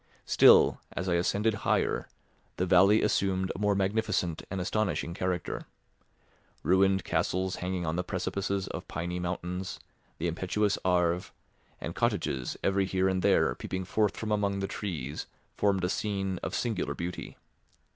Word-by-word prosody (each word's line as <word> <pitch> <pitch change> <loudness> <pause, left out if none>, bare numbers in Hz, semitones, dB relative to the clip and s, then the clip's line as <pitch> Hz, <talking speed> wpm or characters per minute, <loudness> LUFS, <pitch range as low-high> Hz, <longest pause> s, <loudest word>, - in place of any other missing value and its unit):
Still, - - +6
as 95 - -3
I 90 - +2
ascended 100 +6 +2
higher, - - +1 0.5
the 90 - +1
valley 95 +4 +5
assumed 95 -3 +1
a - - -6
more 105 -1 +2
magnificent 95 -4 0
and 95 - -3
astonishing 90 -4 -1
character. 90 -1 -3 1.0
Ruined 95 +1 +3
castles 95 0 0
hanging 90 -1 -2
on 80 +1 -1
the 90 - 0
precipices 100 +1 -2
of - - -6
piny 85 +2 -3
mountains, 90 +1 -4 0.4
the 85 - -1
impetuous 95 +4 0
Arve, 90 -1 +1 0.5
and - - -5
cottages 65 -2 -1
every 95 0 +2
here 95 0 +1
and 95 -1 +1
there 60 - +3
peeping 95 +8 -4
forth 105 +2 +1
from 110 -1 -3
among 100 -1 +1
the 100 0 -2
trees 80 - -4 0.3
formed 100 -3 +1
a - - +2
scene 95 -2 -2
of - - -3
singular 95 -12 -1
beauty. 90 +1 -5
95 Hz, 145 wpm, -29 LUFS, 90-100 Hz, 1.0 s, Still